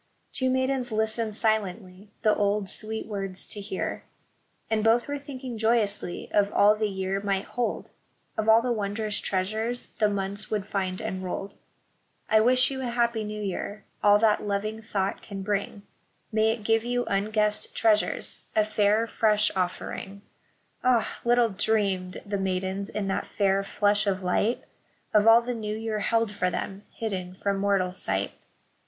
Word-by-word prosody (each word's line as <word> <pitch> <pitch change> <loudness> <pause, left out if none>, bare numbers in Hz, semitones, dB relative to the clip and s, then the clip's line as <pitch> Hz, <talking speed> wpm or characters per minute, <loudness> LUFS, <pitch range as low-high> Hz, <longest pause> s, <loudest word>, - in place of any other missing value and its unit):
Two 260 -1 +2
maidens 260 -1 0
listened 220 0 0
silently 205 -3 -1
the 215 - +5
old, 205 -1 +1
sweet 220 +2 -3
words 195 -3 -4
to 205 - -3
hear; 195 -1 -4 0.6
And 220 -1 0
both 230 +2 +3
were 285 0 -3
thinking 260 -4 -7
joyously 220 -5 0
of 205 0 +3
all 205 +1 +6
the 215 0 0
year 190 0 -2
might 195 -1 -1
hold, 245 -2 -3 0.2
— - - -42
Of 220 0 0
all 225 +1 +7
the 250 - 0
wondrous 210 -1 -1
treasures 220 +6 -2
the 210 -1 +4
months 200 +1 -2
would 210 -3 -1
find 190 -2 -2
enrolled. 190 -1 -4 0.4
" - - -42
I 220 - +7
wish 255 +3 +4
you 265 -1 -4
a 255 - -2
Happy 235 -2 +1
New 210 0 -5
Year 200 +1 -4
— - - -37
all 205 0 +7
that 215 0 +3
loving 210 +2 -2
thought 195 -3 -2
can 195 -1 -7
bring; 200 0 -2 0.5
May 220 0 +3
it 225 -1 -2
give 225 +1 +2
you 245 0 -1
unguessed 210 +1 0
treasures, 215 -2 +1
a 215 -1 +4
fair, 215 +1 +2
fresh 215 -2 +2
offering." 190 +2 -3 0.6
Ah! 250 -3 +2
little 240 -1 +4
dreamed 195 -3 0
the 200 -1 -2
maidens 190 +1 -2
in 205 -1 -3
that 195 - -1
fair 195 -1 +3
flush 205 +1 +1
of 190 -1 0
light 205 +6 +1 0.5
Of 210 0 +5
all 230 +1 +8
the 245 +1 -2
new 215 -2 -3
year 220 -1 -2
held 230 0 +1
for 190 -3 0
them, 195 +3 -5
hidden 185 -5 -4
from 200 -1 +1
mortal 195 -2 +2
sight. 95 - -2
210 Hz, 165 wpm, -27 LUFS, 195-225 Hz, 0.6 s, all